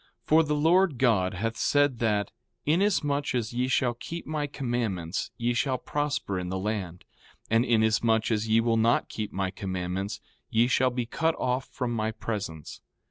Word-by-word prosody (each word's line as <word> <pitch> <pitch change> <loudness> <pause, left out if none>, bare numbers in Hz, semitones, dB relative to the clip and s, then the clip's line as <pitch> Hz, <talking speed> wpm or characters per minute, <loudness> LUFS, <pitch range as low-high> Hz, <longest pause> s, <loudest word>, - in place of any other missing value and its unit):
4:4 - - -37
For 160 +1 +6
the 150 -1 0
Lord 165 0 +3
God 105 -8 +2
hath 115 +4 -2
said 145 -3 +2
that: 105 -3 0 0.3
Inasmuch 150 -5 +1
as 120 -1 -2
ye 125 +1 0
shall 130 -1 +2
keep 165 +8 -7
my 150 -2 -2
commandments 115 - -2
ye 120 +1 0
shall 130 +1 0
prosper 145 -9 -2
in 90 0 -4
the 95 - -2
land; 95 -3 -4 0.5
and 115 +1 +4
inasmuch 110 -1 +2
as 110 0 0
ye 110 +1 +4
will 115 -1 +2
not 115 +2 +2
keep 110 -1 -4
my 95 -1 -2
commandments 95 +1 -3 0.3
ye 115 +1 +3
shall 130 +1 +3
be 125 -1 -2
cut 160 +7 0
off 125 +1 -1
from 125 -2 -3
my 110 -1 -1
presence. 100 -8 -5
115 Hz, 175 wpm, -27 LUFS, 105-135 Hz, 0.5 s, For